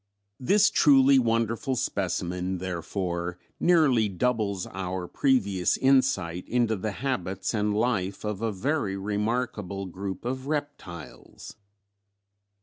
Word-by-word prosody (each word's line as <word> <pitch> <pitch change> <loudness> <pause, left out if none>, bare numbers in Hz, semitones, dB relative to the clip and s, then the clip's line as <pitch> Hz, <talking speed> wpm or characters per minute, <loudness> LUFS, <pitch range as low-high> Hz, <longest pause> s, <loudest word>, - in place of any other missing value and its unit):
"This 200 +10 +4
truly 135 -2 +6
wonderful 115 +2 0
specimen, 90 -3 -2
therefore, 85 -1 -3 0.2
nearly 140 -11 +4
doubles 100 -2 -1
our 95 -1 -4
previous 100 -10 +1
insight 130 -11 +2
into 120 -2 +2
the 105 +2 -3
habits 95 -8 -2
and 105 -1 0
life 100 -5 -1
of 105 -1 -3
a 115 -1 0
very 105 -2 -1
remarkable 105 -1 -2
group 95 +2 -6
of 130 +2 -3
reptiles." 145 - -6
105 Hz, 105 wpm, -27 LUFS, 95-125 Hz, 0.2 s, truly